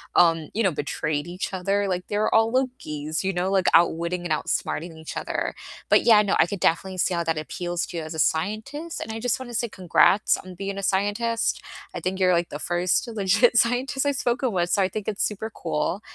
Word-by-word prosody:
um, 165 -3 +4
you 225 - 0
know, 190 - +3
betrayed 150 +1 -2
each 180 +2 -5
other, 200 +2 0
like, 180 0 -2
they 205 - -2
were 215 - +1
all 225 +1 +4
Lokis, 160 - -2
you 195 - 0
know, 180 +2 -1
like, 190 -2 +2
outwitting 170 +1 +2
and 175 - -5
outsmarting 160 +1 -2
each 160 0 -7
other, - - -2 0.4
but - - +5
yeah, 220 -3 +7
no, 200 -1 +1
I - - +6
could 185 +1 -6
definitely 185 +3 +1
see 180 - +1
how 170 -1 -1
that 160 -1 0
appeals 175 +2 -3
to 175 - -7
you 165 - -3
as 155 - -7
a 160 - -5
scientist, 215 - -1
and 220 - -5
I 225 - -5
just 245 0 0
want 260 -2 -8
to - - -6
say 235 - 0
congrats 190 +2 +3 0.2
on 185 - -9
being 195 +2 -5
a 200 - -4
scientist, 205 +5 0 0.3
I - - -4
think 190 +1 -3
you're, 185 -1 +4
like, 170 0 +1
the 145 - -6
1st 175 +5 0
legit 220 +2 +2
scientist 255 +4 +2
I've 285 -1 +1
spoken 245 0 0
with, 175 -3 0
so 200 - +3
I 190 - +3
think 215 0 -5
it's 210 -2 -1
super 220 +1 -3
cool, 170 +4 -2
190 Hz, 230 wpm, -24 LUFS, 170-220 Hz, 0.4 s, yeah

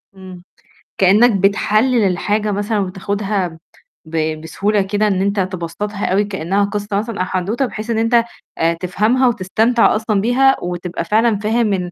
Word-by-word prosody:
إمم، 185 -2 -11 0.5
كإنك 205 +6 +5
بتحلل 215 +4 +2
الحاجة 210 +4 -1
مثلًا 205 +2 -1
وبتاخدها 195 -2 -3 0.5
ب 155 -1 -2
بسهولة 200 +6 0
كده 205 +2 0
إن 190 -2 0
أنت 200 +1 0
تبسّطها 185 +3 -3
أوي 195 +3 +2
كإنها 195 0 -1
قصّة 205 0 -2
مثلًا 220 +1 -4
أو 185 - +1
حدوته 195 +9 -1
بحيث 220 -2 -7
إن 230 - 0
أنت 230 +1 +3 0.3
آآ، 165 +1 +2
تفهمها 210 +9 +1
وتستمتع 225 +3 +2
أصلًا 215 -2 0
بيها، 265 +4 +3
وتبقى 175 -1 -4
فعلًا 220 +2 +2
فاهم 215 0 +1
إن 180 -2 -3
205 Hz, 150 wpm, -18 LUFS, 185-220 Hz, 0.5 s, كإنك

